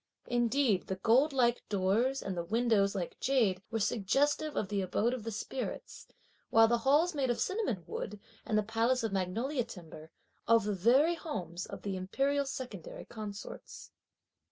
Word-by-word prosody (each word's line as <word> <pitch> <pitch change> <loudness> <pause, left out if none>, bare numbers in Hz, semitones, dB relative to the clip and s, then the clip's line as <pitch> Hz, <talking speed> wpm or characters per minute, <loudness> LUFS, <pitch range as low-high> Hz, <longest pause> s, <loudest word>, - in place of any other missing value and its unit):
Indeed, 240 -3 +1
the 190 - -2
gold 240 +10 +3
like 245 -3 +2
doors 210 +7 +1
and 190 - -3
the 170 - -2
windows 215 0 +2
like 180 -3 -4
jade 225 -9 +2
were 225 -1 -2
suggestive 280 +9 +1
of 205 - -1
the 200 0 -1
abode 205 +6 0
of 225 -3 -4
spirits; 250 +4 -5 0.4
while 225 0 +6
the 235 +1 +2
halls 295 +8 +3
made 275 -4 0
of 240 - 0
cinnamon 375 - -1
wood 210 +1 -5 0.2
and 215 - 0
the 215 - +2
palace 230 +4 +1
of 220 -3 -1
magnolia 225 +9 -1
timber, 165 -8 -11 0.4
of 230 -1 +5
the 210 0 -1
very 250 - +4
homes 185 - -5
of - - -9
the 200 -2 -2
imperial 275 +10 0
secondary 250 - -7
consorts. 210 -2 -8
225 Hz, 160 wpm, -32 LUFS, 195-265 Hz, 0.4 s, while